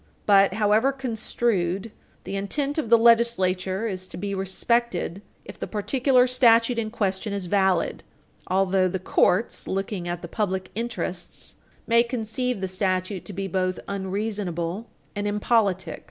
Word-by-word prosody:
But 195 -2 +5
however 215 +5 +3
construed, 225 -6 -1 0.3
the 195 - -5
intent 280 +10 -1
of 275 - -3
the 235 - +7
legislature 225 -4 +3
is 185 -4 -4
to - - -10
be 200 +1 -3
respected, 195 0 -1 0.2
if - - -11
the - - -4
particular 250 +4 +2
statute 240 -2 +4
in 220 -1 -2
question 200 -2 -2
is 200 -2 -2
valid, 190 -2 +1 0.5
although 190 0 +2
the 185 - -2
courts, 185 +3 +1
looking 195 -1 -3
at 175 0 -4
the - - -5
public 190 -1 -2
interests, 225 -6 -5 0.3
may 235 0 +5
conceive 240 -1 -2
the 190 - -1
statute 185 0 -2
to 205 - -8
be 195 +1 -3
both 185 0 -1
unreasonable 195 -1 -3 0.3
and 205 0 -2
impolitic. 205 -2 +1
200 Hz, 140 wpm, -25 LUFS, 185-230 Hz, 0.5 s, the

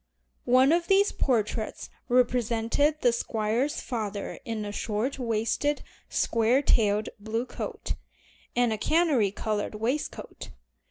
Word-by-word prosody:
One 260 +3 +6
of 340 +1 +2
these 395 +1 +4
portraits 220 -3 -1 0.2
represented 245 +4 +2
the 245 - +5
Squire's 235 +5 -1
father 210 -4 -4
in 225 -2 -3
a 205 - -4
short 220 +6 -2
waisted, 235 +5 0 0.3
square 230 +5 +2
tailed 215 -4 +2
blue 225 +3 -2
coat, - - -5 0.6
and 240 -2 +3
a 215 - -4
canary 305 - +3
colored 210 +1 -3
waistcoat. 240 +8 -3
230 Hz, 115 wpm, -27 LUFS, 215-270 Hz, 0.6 s, One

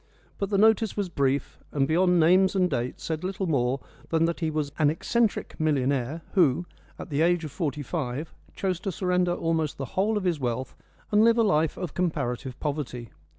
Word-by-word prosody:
But 200 - -1
the 200 - +1
notice 220 +1 +3
was 200 -3 -1
brief, 140 -3 -1
and 135 -2 +1
beyond 180 +2 +3
names 185 +4 +4
and 185 -1 +3
dates 120 +1 -3
said 160 +1 -3
little 190 +1 -2
more 135 -5 +1 0.3
than 165 0 +2
that 170 0 -2
he 160 -2 0
was 150 -2 -2
"an 150 -2 +5
eccentric 220 +8 -1
millionaire, 140 0 0
who, 175 -3 +3 0.3
at - - -9
the 145 +1 +1
age 175 0 +2
of 150 - -6
forty 150 -3 -3
five, 145 0 -4 0.2
chose 185 -3 -1
to 195 +1 -3
surrender 180 0 +1
almost 160 -3 -1
the 135 - -3
whole 210 +3 +1
of 205 - -2
his 175 -4 0
wealth 125 0 -3 0.4
and 210 +1 +5
live 230 +1 +5
a 230 - +4
life 160 -7 +2
of 180 -5 -5
comparative 135 -7 -2
poverty. 140 -6 -4
160 Hz, 195 wpm, -26 LUFS, 140-185 Hz, 0.4 s, an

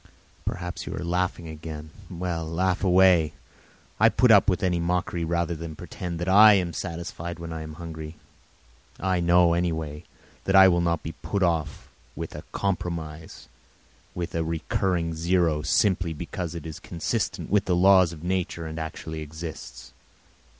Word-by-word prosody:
Perhaps 90 0 -4
you - - -4
are - - -5
laughing 85 0 -1
again? 80 -1 -8 0.2
Laugh 90 +1 -2
away; 90 -4 +5 0.7
I - - +5
will - - +8
put 125 -2 +4
up 105 -1 +6
with 90 -1 0
any 90 -2 +1
mockery 85 0 -1
rather 85 +1 0
than 80 0 -7
pretend 85 +2 -6
that 85 +2 -4
I 105 +3 +8
am 90 -3 0
satisfied 85 -1 -5
when 85 -1 -7
I 80 - -5
am 80 0 -7
hungry. 80 -1 -8 0.8
I 95 -1 0
know, 85 0 +4
anyway, 80 -3 -2 0.4
that 95 - +2
I 95 0 +9
will 85 -1 +2
not 85 -2 0
be 80 - -4
put 80 +6 -3
off 80 -4 -1 0.3
with - - -6
a - - -7
compromise, 80 -5 -4 0.7
with 90 0 -4
a 85 - 0
recurring 85 +1 -1
zero, 85 -1 +1
simply 90 +1 +2
because 85 +2 -5
it 85 - -7
is 80 -2 -7
consistent 85 0 -3
with 100 -1 +3
the 90 - +1
laws 95 -1 +6
of 80 -1 -10
nature 90 -2 -2
and 80 0 -5
actually 80 0 -6
exists. 80 +1 -8
85 Hz, 160 wpm, -26 LUFS, 80-90 Hz, 0.8 s, I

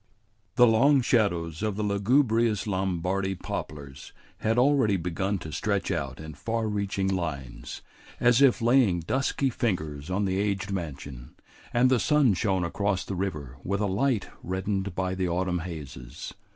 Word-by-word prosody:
The 125 - +7
long 130 +5 +5
shadows 85 -9 +1
of 105 -2 -1
the 105 - -2
lugubrious 115 +1 +2
Lombardy 95 0 -1
poplars 70 -5 -7 0.3
had 110 +1 0
already 125 -6 +4
begun 95 +3 -1
to 80 -3 -8
stretch 100 +6 -1
out 70 -6 -3
in 80 0 -8
far 115 +9 -2
reaching 100 -2 -1
lines, 80 -10 -4 0.4
as 120 +1 +4
if 130 -4 +4
laying 120 -8 +4
dusky 130 - 0
fingers 80 -10 -2
on 100 +2 0
the 95 0 0
aged 100 -1 -1
mansion, 70 -8 -6 0.4
and 125 +2 +3
the 130 - +4
sun 150 -6 +4
shone 95 -1 0
across 95 +1 -1
the - - -4
river 75 -9 -4
with 100 +1 -1
a 105 - +1
light 105 +3 0
reddened 95 +1 -2
by 95 0 -1
the 95 -1 -1
autumn 90 +1 0
hazes. 75 -8 -8
95 Hz, 150 wpm, -27 LUFS, 85-110 Hz, 0.4 s, The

